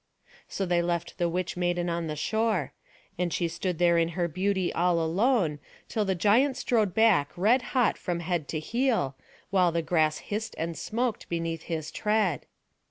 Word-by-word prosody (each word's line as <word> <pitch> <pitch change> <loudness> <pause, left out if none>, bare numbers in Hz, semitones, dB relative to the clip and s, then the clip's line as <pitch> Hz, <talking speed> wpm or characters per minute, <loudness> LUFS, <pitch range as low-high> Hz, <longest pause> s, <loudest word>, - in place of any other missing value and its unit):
So 195 - -3
they 175 -1 +2
left 170 +1 -3
the 175 -1 +2
witch 180 +1 -2
maiden 175 0 0
on 170 -1 -2
the 155 - -3
shore; 210 - 0 0.5
and 180 -1 0
she 170 - 0
stood 175 +1 -3
there 170 0 +4
in 165 0 +2
her 175 -1 +1
beauty 185 +2 -1
all 175 0 +2
alone, 170 - +1 0.3
till 215 -2 -1
the 190 -1 0
giant 235 +9 +3
strode 215 -6 +1
back 210 -11 +4
red 225 +8 +4 0.2
hot 245 -3 +3
from 175 -2 -2
head 170 -4 -2
to 155 - -3
heel, 225 - 0 0.4
while 180 -3 +4
the 165 0 -1
grass 155 -1 +2
hissed 215 +2 -5
and 165 +1 -3
smoked 235 +4 -2
beneath 165 -1 -3
his 160 -2 -3
tread. 210 -6 0
175 Hz, 175 wpm, -27 LUFS, 165-210 Hz, 0.5 s, there